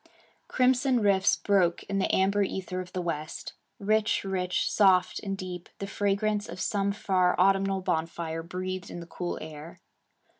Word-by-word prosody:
Crimson 255 0 +3
rifts 200 -3 +3
broke 185 -4 +2
in 195 0 -2
the 190 - +1
amber 200 +2 +2
ether 185 -1 -2
of 180 0 -10
the 180 - -3
west. 155 -2 -4 0.2
Rich, 215 +1 +1
rich, 185 -2 -1
soft, 190 -3 +3
and 195 -1 -4
deep, 180 -2 -7
the 200 - -4
fragrance 205 +1 0
of 175 +2 -7
some 200 0 0
far 185 -3 +1
autumnal 195 0 +3
bonfire 165 -2 -2
breathed 185 +2 -5
in - - -7
the 170 - -8
cool 175 +1 -4
air. 155 +1 -9
190 Hz, 155 wpm, -28 LUFS, 180-200 Hz, 0.2 s, Crimson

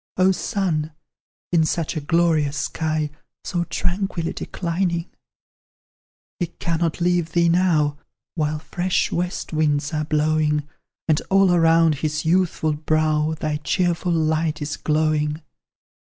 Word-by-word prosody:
O 185 +1 +5
Sun, 170 -5 -1 0.6
in 170 -2 +4
such 165 +1 -1
a 155 - -2
glorious 155 -2 +2
sky, 155 +1 -1 0.3
So 175 -1 -2
tranquilly 180 -2 -2
declining; 170 -1 -2 1.3
He 175 - 0
cannot 165 0 -2
leave 175 -2 +1
thee 170 -1 +3
now, 160 -5 +2 0.3
While 155 -2 -1
fresh 175 +4 -1
west 175 0 -3
winds 150 0 +1
are 155 -1 -1
blowing, 150 -1 +1 0.4
And 155 -2 +2
all 195 -1 +4
around 165 -3 +4
his 155 0 -1
youthful 165 -2 +2
brow 155 0 +1
Thy 155 -1 -1
cheerful 175 +2 0
light 160 -1 +1
is 150 0 -3
glowing! 155 0 0
160 Hz, 120 wpm, -22 LUFS, 155-175 Hz, 1.3 s, O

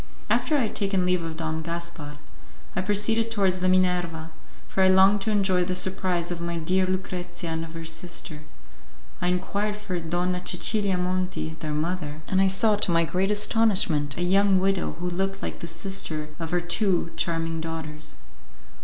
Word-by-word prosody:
After 305 - +2
I - - +2
had 220 - -2
taken 195 -2 +1
leave 180 -1 +2
of 165 -1 -5
Don 160 -1 -2
Gaspar, 170 -3 -5 0.6
I 185 - +1
proceeded 210 +3 +2
towards 195 -4 +1
the 185 0 +2
Minerva, 175 -3 +1 0.4
for 190 - -1
I 190 - +6
longed 190 +2 +5
to 220 - -1
enjoy 190 -4 +2
the 185 +1 -1
surprise 180 -2 0
of 170 -1 -4
my 170 0 -2
dear 185 +3 +1
Lucrezia 180 -2 -3
and 160 0 -2
of 165 0 -9
her 165 0 -6
sister; 160 -1 -4 0.8
I 180 - +1
inquired 200 +3 -1
for 205 -4 -4
Donna 175 +2 -1
Cecilia 195 +1 +1
Monti, 180 -2 -2
their 155 -2 -3
mother, 155 -1 -3
and 190 0 +3
I 195 - +5
saw, 205 +3 +2
to 205 - 0
my 170 -1 +4
great 185 +4 0
astonishment, 205 - +2
a 175 - 0
young 195 +1 +4
widow 195 0 0
who 175 +1 -5
looked 195 +2 -2
like - - -4
the 170 - -6
sister 165 -3 -3
of 165 -1 -4
her 175 +1 +1
two 175 -1 +1
charming 165 -1 -1
daughters. 160 -2 -6
180 Hz, 180 wpm, -26 LUFS, 165-195 Hz, 0.8 s, I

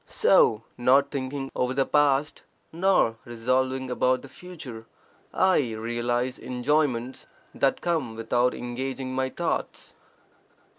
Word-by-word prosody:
So 110 0 +3 0.2
not 135 +3 +4
thinking 135 0 -4
over 125 +1 0
the 135 0 +2
past, 145 0 +2 0.3
nor 170 -10 +2
resolving 130 +2 -1
about 130 +1 +1
the 140 - -11
future, 135 -11 -10 0.4
I 150 -11 +2
realize 120 +3 -2
enjoyments 130 -1 -1 0.3
that 135 - +1
come 155 -10 -1
without 120 +2 +1
engaging 130 +2 -4
my 130 0 0
thoughts. 170 +5 -3
130 Hz, 110 wpm, -26 LUFS, 120-140 Hz, 0.4 s, not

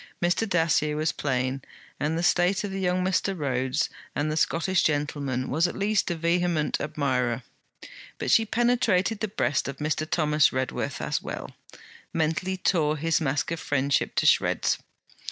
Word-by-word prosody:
Mr. 180 +5 +1
Dacier 160 -4 +2
was 155 +1 0
plain, 130 -1 -1 0.4
and 155 +2 0
the 170 - -1
state 180 +3 +2
of 200 -2 -4
young 185 -1 0
Mr. 190 +1 0
Rhodes; 130 -3 0 0.3
and 150 +1 0
the - - -1
Scottish 170 +3 +1
gentleman 145 -4 -1
was 160 +5 +2
at - - -6
least 205 0 +1
a 175 - -1
vehement 170 -1 0
admirer. 130 -5 -1 0.7
But - - -2
she 225 -1 +4
penetrated 225 -4 +2
the 220 - -1
breast 170 -8 0
of 140 -1 -5
Mr. 155 +1 -2
Thomas 150 -2 +3
Redworth 130 0 -3
as - - -1
well, - - -6 0.6
mentally 165 +4 0
tore 155 -5 +1
his 165 +2 +1
mask 145 +1 -1
of 165 - -2
friendship 140 -1 0
to - - +1
shreds. - - +3
160 Hz, 155 wpm, -26 LUFS, 145-180 Hz, 0.7 s, she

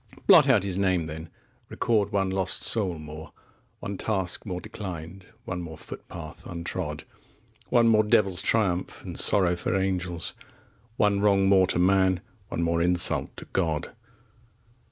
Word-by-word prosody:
20 - - -19
Blot 140 - +7
out 110 -8 +4
his 95 -1 -2
name, 95 -4 +1
then, 80 +1 -8 0.4
record 105 -3 0
one 95 -1 0
lost 95 -1 0
soul 95 -7 +1
more, 75 +1 -10 0.5
One 100 0 -5
task 95 -1 -1
more 90 -2 -3
declined, 90 -1 -8 0.2
one 90 -1 -4
more 80 -2 -8
footpath 80 -3 -10
untrod, 85 -3 -4 0.7
One 120 -1 +4
more 110 -1 +5
devils' 105 -4 +2
triumph 95 -4 -1
and - - -7
sorrow 90 -3 +4
for 90 - -2
angels, 90 -3 -2 0.6
One 100 -1 +2
wrong 100 -1 +3
more 95 -1 +5
to - - -1
man, 95 0 +3 0.3
one 85 - -3
more 85 0 +1
insult 90 0 +3
to - - -8
God! 80 -5 -1
95 Hz, 150 wpm, -26 LUFS, 85-100 Hz, 0.7 s, Blot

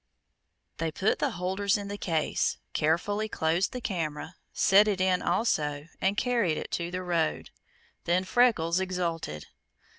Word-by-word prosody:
They 165 -1 -1
put 190 +7 0
the - - +1
holders 190 +3 0
in 200 -1 -6
the 200 - -4
case, 165 -6 0 0.2
carefully 205 +8 0
closed 165 +1 0
the 250 - -4
camera, 165 -7 -3 0.2
set 205 +2 +5
it 200 -3 0
in 185 -1 +2
also, 150 -8 0
and 195 +2 +1
carried 230 -10 +1
it - - -6
to 170 0 -2
the 185 +1 -4
road. 170 -3 -1 0.5
Then 175 +2 +2
Freckles 185 -6 +3
exulted. 170 - -3
180 Hz, 145 wpm, -28 LUFS, 165-200 Hz, 0.5 s, set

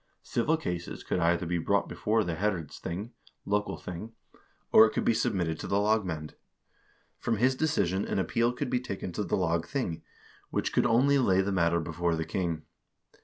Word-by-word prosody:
Civil 155 +7 +1
cases 90 - -4
could - - -1
either 85 +1 +2
be 85 +1 -1
brought - - +1
before 110 +1 +1
the 85 - -2
herredsthing 95 - -3 0.3
(local 105 +1 0
thing), 90 +6 -7 0.6
or 110 - +9
it - - -5
could - - -1
be - - +4
submitted 90 -8 0
to - - -5
the 100 - +1
lagmand. 95 -8 0 0.9
From 115 - 0
his 125 +5 +3
decision 100 - +1
an - - -2
appeal 115 +6 +1
could 125 +1 -4
be 125 - +2
taken 100 -7 -5
to 105 - -2
the 90 - 0
lagthing, 85 - -1 0.5
which - - -1
could - - +3
only 135 +4 +4
lay 95 -7 +4
the 100 +1 -1
matter 85 -2 +2
before 85 +1 -1
the 80 0 -2
king. 85 -2 -2
95 Hz, 175 wpm, -29 LUFS, 85-115 Hz, 0.9 s, or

